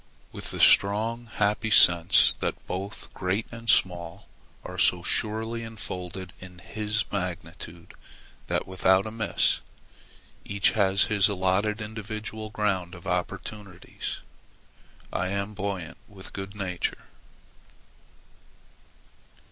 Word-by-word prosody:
With -, -, -7 dB
the -, -, -6 dB
strong, 115 Hz, +4 st, +4 dB
happy 105 Hz, 0 st, 0 dB
sense 85 Hz, -2 st, +7 dB
that -, -, -3 dB
both 95 Hz, +3 st, -6 dB
great 95 Hz, +4 st, -1 dB
and 115 Hz, -1 st, -7 dB
small 90 Hz, 0 st, +1 dB, 0.4 s
are -, -, -6 dB
so 90 Hz, -1 st, +4 dB
surely 110 Hz, +3 st, 0 dB
enfolded 95 Hz, -5 st, -6 dB
in 90 Hz, -1 st, -11 dB
His 105 Hz, +3 st, -2 dB
magnitude 90 Hz, -3 st, -5 dB, 0.5 s
that, -, -, 0 dB
without 95 Hz, +1 st, +3 dB
a 110 Hz, -, -5 dB
miss, 110 Hz, 0 st, +2 dB, 0.8 s
each 100 Hz, 0 st, +2 dB
has 100 Hz, -2 st, +3 dB
his 105 Hz, -3 st, +3 dB
allotted 100 Hz, +3 st, 0 dB
individual 110 Hz, 0 st, -6 dB
ground 95 Hz, -4 st, -1 dB
of 85 Hz, +1 st, -13 dB
opportunities, 95 Hz, +2 st, -4 dB, 0.9 s
I 90 Hz, -, 0 dB
am 100 Hz, +2 st, -2 dB
buoyant 95 Hz, -5 st, -4 dB
with 95 Hz, -2 st, -11 dB
good 95 Hz, +1 st, -6 dB
nature. 95 Hz, -4 st, -3 dB
100 Hz, 110 wpm, -27 LUFS, 90-110 Hz, 0.9 s, sense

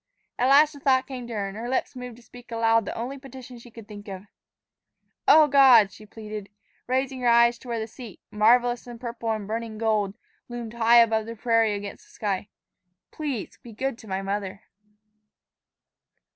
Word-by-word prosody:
At 250 Hz, +2 st, +3 dB
last 295 Hz, +3 st, +6 dB
a 285 Hz, -, -12 dB
thought 260 Hz, -2 st, +2 dB
came 255 Hz, -3 st, -7 dB
to 235 Hz, -, -7 dB
her, 200 Hz, -2 st, -2 dB
and 195 Hz, -, -8 dB
her 230 Hz, +3 st, -5 dB
lips 260 Hz, +1 st, -2 dB
moved 250 Hz, -2 st, -8 dB
to 240 Hz, -, -18 dB
speak 245 Hz, 0 st, -15 dB
aloud 225 Hz, -1 st, +2 dB
the -, -, -5 dB
only 255 Hz, +4 st, -5 dB
petition 260 Hz, -2 st, -11 dB
she 240 Hz, -, -14 dB
could 225 Hz, -2 st, -13 dB
think 205 Hz, -1 st, -11 dB
of: 190 Hz, -1 st, -7 dB, 1.0 s
"O 310 Hz, -1 st, +7 dB
God," 260 Hz, -7 st, +6 dB
she 210 Hz, +2 st, -14 dB
pleaded, 210 Hz, -1 st, -8 dB, 0.4 s
raising 260 Hz, +1 st, -1 dB
her 245 Hz, -, 0 dB
eyes 235 Hz, 0 st, +4 dB
to -, -, -15 dB
where 235 Hz, -1 st, -2 dB
the 220 Hz, -, -3 dB
seat, 225 Hz, -2 st, -11 dB
marvelous 240 Hz, +3 st, +3 dB
in 240 Hz, -1 st, -9 dB
purple 235 Hz, -1 st, -5 dB
and 215 Hz, -2 st, -4 dB
burning 225 Hz, 0 st, -4 dB
gold, 215 Hz, -3 st, 0 dB, 0.3 s
loomed 240 Hz, -2 st, -6 dB
high 235 Hz, 0 st, +6 dB
over 220 Hz, -1 st, 0 dB
the 230 Hz, +1 st, -8 dB
prairie 225 Hz, -2 st, +2 dB
against 200 Hz, 0 st, -8 dB
the -, -, -22 dB
sky, 205 Hz, -1 st, -3 dB, 0.6 s
"please 280 Hz, -9 st, -5 dB
be 235 Hz, -, -12 dB
good 260 Hz, +2 st, -3 dB
to 220 Hz, -, -13 dB
my 190 Hz, 0 st, -3 dB
mother." 200 Hz, 0 st, -4 dB
230 Hz, 190 wpm, -25 LUFS, 215-250 Hz, 1.0 s, O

